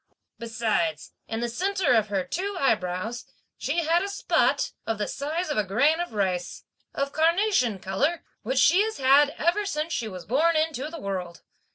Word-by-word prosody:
Besides, 225 -2 -1
in 225 0 -3
the 240 - 0
centre 365 +3 0
of 220 -3 +3
her 195 -2 -1
two 390 - -3
eyebrows, 210 -1 -1 0.3
she 340 - -1
had 335 +2 +3
a 395 - -2
spot, 400 - +1 0.2
of 225 - -1
the 210 - -2
size 310 +4 -3
of - - -2
a - - +2
grain 280 - +2
of 350 -8 -4
rice, 185 -4 -2 0.3
of 280 0 -2
carnation 330 - +2
colour, 275 - -1 0.2
which 260 +4 -3
she 350 +9 +5
has 440 +1 -1
had 275 +2 +5
ever 345 +6 +1
since 320 -4 -3
she 230 - -2
was 185 -4 -8
born 315 +9 +2
into 310 -3 0
the 330 0 -8
world. 185 -5 -5
275 Hz, 180 wpm, -26 LUFS, 215-335 Hz, 0.3 s, she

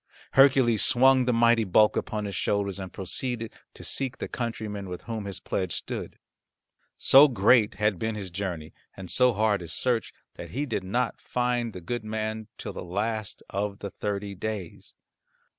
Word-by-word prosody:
Hercules 130 -5 +5
swung 130 +1 +5
the 125 - +2
mighty 115 -1 +4
bulk 105 +2 +4
upon 105 -1 -2
his 100 -2 -4
shoulders 100 0 -1
and 95 -1 -6
proceeded 115 +4 -4 0.2
to - - -11
seek 135 -1 -2
the - - -4
countryman 105 -5 -4
with 90 - -7
whom 110 -3 -5
his 100 -1 -5
pledge 95 -3 -2
stood. - - -5 0.8
So 140 +3 +7
great 110 -3 +4
had 105 -2 +1
been 110 0 -2
his 95 -4 -6
journey, 85 -4 -4 0.2
and 95 -3 -7
so 125 +5 +4
hard 105 -2 +1
his 85 -2 -5
search, 125 -3 0 0.3
that - - -8
he 140 +5 -2
did 110 -8 -2
not 115 +6 -1
find 120 -1 -1
the 90 - -9
good 120 +7 -4
man 110 0 -3
till - - -6
the - - -6
last 105 +4 -3
of 100 +1 -2
the 100 - -6
thirty 100 -1 -4
days. 100 -2 -6
110 Hz, 175 wpm, -27 LUFS, 100-120 Hz, 0.8 s, So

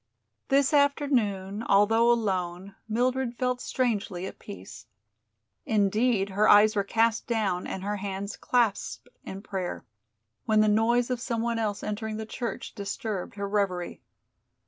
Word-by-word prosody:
This 275 +1 +3
afternoon, 240 -9 +1
although 225 +2 +4
alone, 190 -4 -1 0.2
Mildred 250 +2 0
felt 250 -1 -1
strangely 210 -7 -1
at - - -8
peace. 100 +5 -10 0.8
Indeed, 210 0 +1
her 205 +2 +2
eyes 210 +1 +6
were 200 - +2
cast 225 +2 +1
down 205 -6 -1
and 190 - -5
her 205 +1 -2
hands 200 +1 -4
clasped 235 -5 -1
in 195 +1 -8
prayer, 185 -4 -4 0.6
when 215 -1 +4
the 215 - +4
noise 235 +4 +2
of 245 -1 -2
some 235 -3 -2
one 235 -1 -1
else 210 -2 -2
entering 215 +1 -3
the 220 - -5
church 230 +1 -5
disturbed 200 -2 -4
her 200 0 -3
reverie. 195 -4 -1
215 Hz, 140 wpm, -27 LUFS, 195-235 Hz, 0.8 s, eyes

